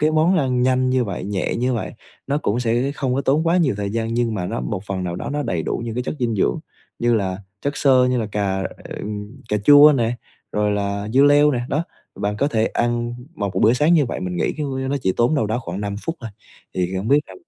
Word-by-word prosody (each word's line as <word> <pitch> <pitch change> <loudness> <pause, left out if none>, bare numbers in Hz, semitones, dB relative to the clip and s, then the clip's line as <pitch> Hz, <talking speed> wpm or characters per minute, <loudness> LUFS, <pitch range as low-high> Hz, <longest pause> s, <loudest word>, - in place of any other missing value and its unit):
Cái 155 +1 +3
món 160 +4 +3
ăn 125 -4 +1
nhanh 130 0 +2
như 130 -1 +2
vậy, 95 -3 -5
nhẹ 100 -2 -2
như 125 +1 0
vậy, 115 - -3 0.3
nó 140 +2 0
cũng 120 -4 -1
sẽ 120 +3 0
không 130 -4 -1
có 135 - +1
tốn 150 +5 +1
quá 170 - +3
nhiều 155 - +2
thời 100 -1 -2
gian 115 +1 -2
nhưng 120 -2 0
mà 90 -3 -2
nó - - -3
một 80 +11 -4
phần 95 -2 -3
nào 85 -1 -3
đó - - -5
nó 145 +1 -1
đầy 90 - -2
đủ - - -3
những 115 - -4
cái 125 - -1
chất 125 - -4
dinh 115 -3 0
dưỡng, - - +1 0.4
như 120 0 +2
là 95 -4 -1 0.2
chất 140 0 -2
xơ, 130 -3 +4
như 125 0 +1
là 110 - -2
cà, 95 -2 -1
ờ, - - -7
ừm, 105 +5 -7
cà 105 - +2
chua 145 +3 +9
nè, 120 0 0 0.4
rồi 105 0 +1
là 100 0 -2
dưa 135 - +6
leo 145 +1 +6
nè. 125 -4 -1
Đó, 155 +4 0 0.3
bạn 105 +1 -2
có 140 +4 +2
thể 110 -5 +1
ăn 120 0 -1 0.2
một 100 -6 -2
b - - 0
bữa 110 - +5
sáng 150 +7 +3
như 155 -4 +4
vậy 120 - -4
mình 90 -1 -3
nghĩ, - - 0
c - - -15
ư, 135 -3 -2
nó 140 - +1
chỉ 95 - +2
tốn 120 +6 +3
đâu 110 -7 +1
đó 110 +3 -1
khoảng 95 -5 -5
5 100 -1 -3
phút 165 0 -3
thôi. 115 -3 -6 0.4
Thì, 90 0 -1
a, - - 0
hông 100 - -4
biết 145 +2 +5
là - - -12
120 Hz, 275 wpm, -21 LUFS, 105-140 Hz, 0.4 s, chua